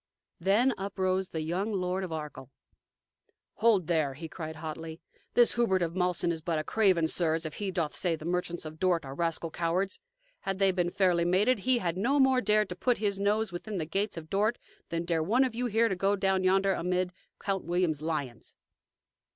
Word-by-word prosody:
Then 210 +9 +3
uprose 190 -1 -1
the 160 - -4
young 185 +7 -1
Lord 185 -1 -1
of 180 - -5
Arkell. 150 -5 -6 1.1
"Hold, 215 -5 +3
there!" 155 -5 0
he 165 +3 -7
cried 160 -1 -7
hotly. 160 +1 -7 0.4
"This 240 -1 +5
Hubert 190 -7 +2
of 165 -1 -2
Malsen 180 -2 +1
is 165 -1 -4
but 165 0 -1
a 155 - -1
craven, 185 -4 +3
sirs, 160 -1 0
if 155 - -6
he 205 -2 -2
doth 170 -5 -1
say 175 -3 0
the 155 0 -10
merchants 175 -1 -2
of 155 0 -8
Dort 175 -4 +1
are 135 - -6
rascal 165 +1 -2
cowards. 175 +4 -1 0.4
Had 195 -1 -3
they 195 -1 +4
been 175 -2 0
fairly 180 -2 +2
mated, 200 +8 +3
he 255 +5 +2
had 175 -5 -2
no 265 +9 +2
more 265 -1 +4
dared 210 -1 +2
to 180 - -5
put 245 +5 +1
his 200 -2 -1
nose 210 +1 +1
within 195 +4 -5
the 160 - -2
gates 195 +4 -1
of 160 -1 -7
Dort 210 +6 +1 0.3
than 165 0 -2
dare 165 -2 +1
one 225 +11 +3
of 255 -3 -1
you 245 +2 -1
here 230 +1 +3
to 195 - -1
go 195 +2 +1
down 190 -1 +1
yonder 195 +1 +3
amid 180 +1 -1 0.3
Count 195 -2 -2
William's 175 -4 0
lions!" 150 -7 -4
180 Hz, 200 wpm, -29 LUFS, 165-200 Hz, 1.1 s, This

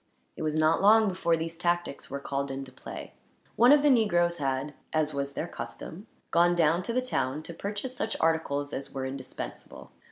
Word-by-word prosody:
It - - -8
was 155 -1 -1
not 155 +1 +3
long 220 +2 +6
before 170 -3 +1
these 165 +1 -4
tactics 175 -3 -1
were 140 - -4
called 140 0 -3
into 135 -1 -6
play. 130 - -9 0.4
One 240 +4 +6
of 295 0 +6
the 295 - +5
negroes 175 -8 +3
had, 135 0 -2 0.2
as 155 -1 +1
was 140 0 -3
their 165 - -3
custom, 185 +4 -8 0.2
gone 175 +1 +4
down 165 +1 +3
to 185 - -4
the 255 +1 +1
town, 150 - -1
to 170 - -8
purchase 205 +8 -4
such 225 -2 -2
articles 150 -3 0
as 135 - -5
were 135 -1 -4
indispensable. 130 -1 -7
165 Hz, 190 wpm, -28 LUFS, 140-185 Hz, 0.4 s, long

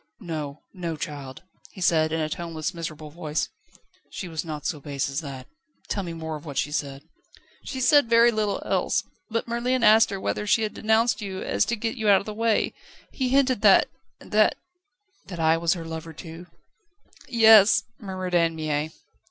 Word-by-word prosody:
"No, 155 -7 -6
no, 170 -4 -4
child," 140 -4 -7 0.3
he - - -12
said 160 -3 +2
in 160 - -1
a 155 - 0
toneless, 160 -1 -4
miserable 155 -3 -7
voice; 155 -1 -3 0.6
"she 185 - -6
was 160 -2 -4
not 155 -3 -6
so 150 - -2
base 140 -1 -3
as 140 +4 -2
that. 135 -4 -8 0.4
Tell 200 - -1
me 175 -3 -5
more 160 -1 -5
of 150 - -9
what 140 -4 -8
she 145 - 0
said." 140 -2 -3 0.6
"She 265 - -5
said 285 -1 +4
very 235 +1 +6
little 215 -2 -1
else. - - 0 0.3
But 230 +1 -2
Merlin 240 +2 0
asked 220 0 +6
her 195 -1 -4
whether 210 - -2
she 220 +2 +3
had 215 - -2
denounced 220 0 +1
you 190 -2 -5
so - - -5
as - - +1
to 235 - -1
get 225 +2 -3
you 220 -2 +1
out 195 -1 +7
of - - -9
the 215 - -5
way. 225 0 +1 0.4
He 260 -2 -1
hinted 260 -4 +2
that 200 -3 +6 0.3
that - - +2 0.4
..." 415 -4 -42
"That 180 -3 -7
I 160 0 +4
was 165 0 +2
her 165 -2 -7
lover 160 0 -7
too?" 165 +2 -10 0.8
"Yes," 220 -5 +7 0.2
murmured 185 -3 -5
Anne 165 -1 +3
Mie. 155 -1 -2
175 Hz, 195 wpm, -25 LUFS, 155-220 Hz, 0.8 s, out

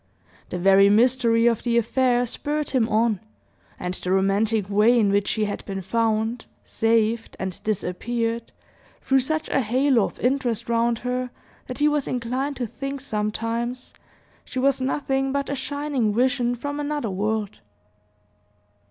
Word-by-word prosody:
The - - -3
very 195 +2 +5
mystery 230 +1 +3
of 235 -2 +3
the 235 -1 +1
affair 245 +1 +2
spurred 295 +5 -3
him 245 -4 +2
on, 220 -2 +2 0.6
and 180 0 -3
the 185 0 -4
romantic 200 +2 +2
way 210 +4 +4
in 205 -3 +3
which 200 0 +1
she 215 -1 0
had 205 - -4
been 195 -1 -4
found, 225 +3 0 0.2
saved, 225 0 0
and 190 -2 -5
disappeared, 230 +3 -2 0.5
threw 270 0 +3
such 310 +4 -1
a - - +2
halo 255 -1 +2
of - - -8
interest 250 -3 0
round 235 0 +1
her, 250 0 -1 0.4
that 255 - -6
he 295 - +3
was 295 -2 0
inclined 255 +4 -2
to 250 - -3
think 275 +5 -5
sometimes 230 +1 -3 0.5
she - - -9
was 270 0 +2
nothing 270 0 0
but 280 0 -2
a - - -1
shining 275 -5 -1
vision 245 0 +1
from 285 +4 -5
another 290 -6 -2
world. 210 +2 -2
235 Hz, 150 wpm, -24 LUFS, 215-260 Hz, 0.6 s, very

